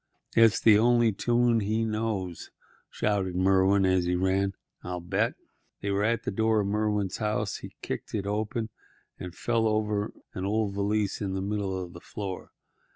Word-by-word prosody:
"It's 115 -2 +6
the 105 -2 +6
only 120 0 +4
tune 120 +2 +2
he 110 +2 0
knows," 105 -6 -3 0.4
shouted 95 -4 -1
Merwin, 95 +1 +4
as 95 -1 +2
he 90 +1 +1
ran. 95 +1 +1 0.3
"I'll 90 0 -4
bet—" 95 +6 0 0.5
They 100 - -1
were 100 +1 +1
at 115 +2 +1
the - - -2
door 110 +1 +2
of - - -2
Merwin's 105 -1 0
house. 105 -2 -1
He - - -10
kicked - - -4
it 100 -2 -2
open 110 +2 -2 0.5
and 90 -1 -7
fell 115 -2 +1
over 105 -1 0 0.2
an 95 - -4
old 105 0 0
valise 100 +1 0
lying 95 -2 -2
in - - -2
the 95 - -2
middle 95 -2 -2
of 90 -1 -7
the 85 - -11
floor. 100 -3 -6
105 Hz, 175 wpm, -28 LUFS, 95-110 Hz, 0.5 s, It's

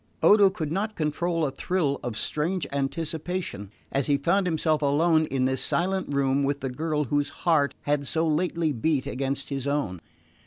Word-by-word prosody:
Odo 205 -2 +7
could 160 -5 -4
not 210 +5 -2
control 165 +1 0
a 135 - -1
thrill 140 -1 -1
of 115 -3 -4
strange 160 +6 -1
anticipation 150 - -3 0.2
as 135 -1 0
he 145 -1 +3
found 180 +7 +1
himself 160 -2 +1
alone 155 +2 +3
in 130 -1 0
this 130 0 0
silent 190 -1 0
room 140 0 +2
with 140 0 -1
the 135 - -3
girl 150 +2 -1
whose 145 +2 0 0.2
heart 155 -5 +3
had 145 -1 0
so 165 0 +1
lately 160 0 0
beat 140 +2 0
against 135 +1 -3
his 135 -1 -3
own. 140 - -1
150 Hz, 170 wpm, -26 LUFS, 140-170 Hz, 0.2 s, Odo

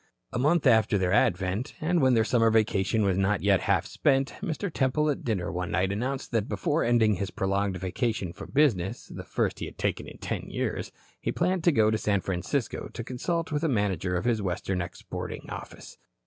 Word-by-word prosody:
A 120 - -1
month 150 +5 +3
after 110 -4 +4
their 90 -2 +1
advent, 95 - +1
and 170 +1 +1
when 130 -2 +4
their 110 - +4
summer 115 -1 +3
vacation 110 -1 +2
was 95 -1 +1
not 95 +1 +1
yet 100 -2 +4
half - - +1
spent, 135 0 +1
Mr. 170 +2 -3
Temple 150 +3 +2
at 140 - -4
dinner 100 -7 -1
one 90 -1 -3
night 95 +1 +1
announced 130 +6 -3
that 115 -2 0
before 160 -1 0
ending 110 -4 +3
his 100 +1 -2
prolonged 100 0 -1
vacation 95 0 -2
from - - -9
business 115 -11 +1
the - - -8
first - - -1
he - - -3
had - - -10
taken - - -1
in - - -10
ten - - -4
years - - -3 0.3
he - - -2
planned 180 0 0
to 170 - +6
go 110 -6 +3
to 110 - 0
San 100 -2 +1
Francisco 95 +8 -2
to 115 - -5
consult 165 +8 -2
with 150 -1 0
the 165 - +1
manager 95 - 0
of 90 - -1
his 115 -3 +2
western 90 0 -2
exporting 90 0 -6
office. - - -9
110 Hz, 205 wpm, -27 LUFS, 95-135 Hz, 0.3 s, to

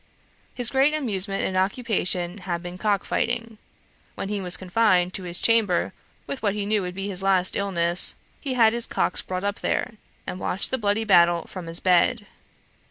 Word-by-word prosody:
His 245 -2 +2
great 275 +3 +3
amusement 200 -8 +1
and 185 - -2
occupation 190 -3 0
had 175 -2 -4
been 180 +1 -7
cock 205 -2 0
fighting. 230 -2 -2 0.6
When 195 - -5
he 205 -1 -2
was 180 -2 -2
confined 185 -2 +2
to - - -5
his 175 0 -4
chamber 220 -5 +2 0.3
with 275 - -6
what 205 -2 0
he 205 -1 -2
knew 210 0 +1
would 180 -1 -5
be 195 +1 -4
his 190 -2 -1
last 190 -1 +2
illness, 175 -3 +1 0.2
he 270 -3 -3
had 225 -2 +5
his 235 0 +1
cocks - - 0
brought 185 0 -5
up 205 +1 -2
there, - - -1 0.3
and 180 - -5
watched 185 - +1
the 260 - 0
bloody 205 +1 0
battle 175 -5 +4
from 185 -3 -8
his 165 +1 -3
bed. 190 +5 +2
195 Hz, 185 wpm, -24 LUFS, 180-225 Hz, 0.6 s, had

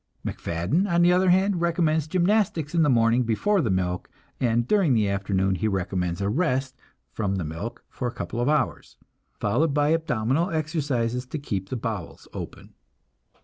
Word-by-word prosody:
MacFadden, 90 - -1
on 170 0 +4
the 175 +1 +5
other 185 +1 +3
hand, 190 0 +3
recommends 165 -3 +1
gymnastics 180 -3 +1
in 170 - +3
the 150 - +4
morning 115 0 +4
before 170 - +1
the 115 - 0
milk, 90 -1 -1 0.3
and 120 -1 +1
during 190 -11 +3
the 105 -2 +2
afternoon 95 -1 0
he 110 +4 -1
recommends 95 -2 -2
a 100 - 0
rest 130 - 0 0.4
from 100 -3 -1
the 95 - -2
milk 90 +10 -6
for 125 - -4
a - - -2
couple 120 - -4
of 125 - +1
hours, 145 - -1 0.4
followed 140 +9 +1
by 145 0 +3
abdominal 155 - 0
exercises 140 -7 -1
to 155 - -4
keep 100 -9 -4
the 130 - -2
bowels 110 -6 -5
open. - - -8
125 Hz, 170 wpm, -25 LUFS, 100-165 Hz, 0.4 s, the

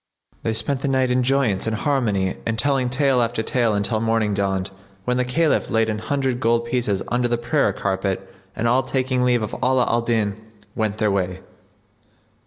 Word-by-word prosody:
They 115 - -1
spent 130 +4 -1
the - - -1
night 130 -2 +1
in 125 +1 +2
joyance 125 -6 +1
and 110 - 0
harmony 105 -8 0
and 115 0 -2
telling 130 0 +1
tale 130 0 +2
after 115 -1 -1
tale 115 -3 +1
until 105 +2 0
morning 115 -2 +1
dawned, 95 -1 -1 0.3
when 125 0 +1
the 125 - +2
Caliph 150 +6 +1
laid 115 -1 +2
an 105 - -3
hundred 130 +1 -1
gold 115 -1 +1
pieces 120 -5 -1
under 120 0 +1
the 120 0 0
prayer 120 +5 +1
carpet 95 -1 -2 0.3
and 115 - -1
all 125 +3 +4
taking 130 -1 -1
leave 120 -2 +2
of 105 - -4
Ala 130 -1 +3
al 120 - +1
Din, 110 -3 -1 0.3
went 110 -1 -1
their 110 -1 +1
way. 95 -1 -2
120 Hz, 190 wpm, -22 LUFS, 105-130 Hz, 0.3 s, all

